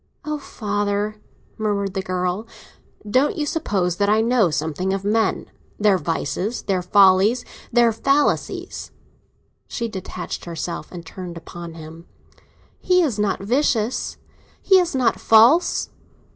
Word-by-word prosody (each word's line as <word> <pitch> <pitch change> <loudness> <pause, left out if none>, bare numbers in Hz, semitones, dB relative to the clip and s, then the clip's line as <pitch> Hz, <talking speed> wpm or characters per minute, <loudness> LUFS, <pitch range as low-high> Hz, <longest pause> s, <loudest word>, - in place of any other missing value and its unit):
"Oh, 300 0 -3
father!" 205 -3 -2 0.4
murmured 200 -3 -1
the 190 - -2
girl. 185 +3 -2 0.6
"Don't 265 - +2
you 300 - -1
suppose 195 - -1
that 200 0 +2
I 215 +1 +4
know 230 -4 +3
something 160 +5 -2
of 195 0 -3
men: 220 0 0 0.3
their 205 -3 +3
vices, 175 +7 -2
their 190 -2 0
follies, 195 +5 +4 0.3
their 240 -1 +4
falsities?" 275 +6 0 0.8
She 235 - -3
detached 190 -4 -6
herself, 170 0 -5
and 170 -2 -9
turned 175 0 -8
upon 170 0 -9
him. 160 +1 -11 0.7
"He 365 -1 +3
is 245 -10 -1
not 205 -2 0
vicious—he 255 - 0
is 350 -5 -1
not 255 -3 +1
false!" 235 +10 +4
205 Hz, 125 wpm, -22 LUFS, 180-240 Hz, 0.8 s, I